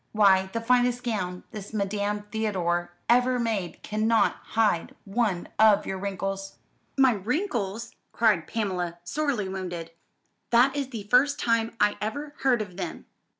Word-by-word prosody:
Why, 190 -3 +4
the 230 - -2
finest 245 +1 +2
gown 185 -7 -3
this 210 -1 -8
Madame 205 0 -1
Theodore 180 -6 -1 0.2
ever 250 +1 +4
made 220 -7 -2
cannot 220 +2 +2 0.2
hide 215 -7 +2
one 200 -4 -1
of 215 -2 +6
your 190 - -4
wrinkles." 195 0 -4 0.4
"My 265 -1 +6
wrinkles!" 230 - -2 0.2
cried 210 -9 +2
Pamela, 180 -6 -2
sorely 270 -1 -1
wounded. 175 -3 -5 0.6
"That 250 +4 +4
is 280 -2 -1
the 225 -5 -6
first 265 +7 +3
time 230 -1 0
I 210 0 +3
ever 285 +8 -4
heard 245 -5 +2
of 185 -3 -13
them. - - -5
215 Hz, 140 wpm, -26 LUFS, 190-240 Hz, 0.6 s, of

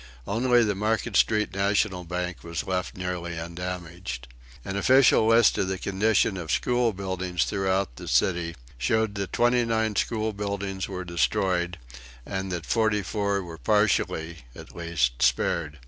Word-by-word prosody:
Only 120 +3 +3
the 105 -2 +1
Market 110 +2 -1
Street 105 +1 +3
National 100 -1 +1
Bank 90 0 -4
was 85 -3 -4
left 90 -1 -3
nearly 90 -2 -4
undamaged. 85 -5 -6 0.4
An 95 - -4
official 125 +1 +5
list 115 0 +5
of 95 - +1
the 95 0 -2
condition 100 +1 +1
of 85 -3 -6
the - - 0
school 120 -1 +2
buildings 95 -3 -2
throughout 95 -8 -1
the - - -8
city 85 -2 +1 0.2
showed 110 - +1
that 100 -2 -4
twenty 120 0 +3
nine 110 -2 0
school 110 +1 0
buildings 100 -1 -3
were 90 -2 -5
destroyed 90 +1 0 0.5
and 95 0 -4
that 85 -2 -4
forty 110 -3 +1
four 100 0 -1
were 85 -2 -9
partially, 85 - +1 0.2
at - - -12
least, 85 -8 -1
spared. 75 +5 +1
95 Hz, 150 wpm, -26 LUFS, 85-105 Hz, 0.5 s, official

